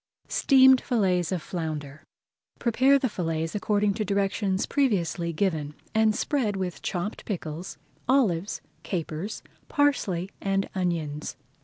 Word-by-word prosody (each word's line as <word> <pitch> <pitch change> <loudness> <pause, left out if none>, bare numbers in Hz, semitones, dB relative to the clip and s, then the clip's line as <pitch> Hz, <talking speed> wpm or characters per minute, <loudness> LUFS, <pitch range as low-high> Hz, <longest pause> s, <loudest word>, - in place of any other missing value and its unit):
STEAMED 265 -2 +6
FILLETS 185 -8 +1
OF 180 -4 -2
FLOUNDER 155 -4 -4 0.6
Prepare 260 +4 +4
the 265 - 0
fillets 165 -6 -2
according 205 0 +1
to 215 +1 -2
directions 200 -1 0
previously 185 - +1
given, 155 -4 -1 0.2
and 220 -1 +3
spread 240 -9 0
with 185 -2 -3
chopped 185 +4 -3
pickles, 170 -3 -5 0.3
olives, 210 -9 +2 0.2
capers, 170 +2 -4 0.3
parsley, 200 -11 +1
and 195 0 0
onions. 165 -5 -2
190 Hz, 115 wpm, -27 LUFS, 170-220 Hz, 0.6 s, STEAMED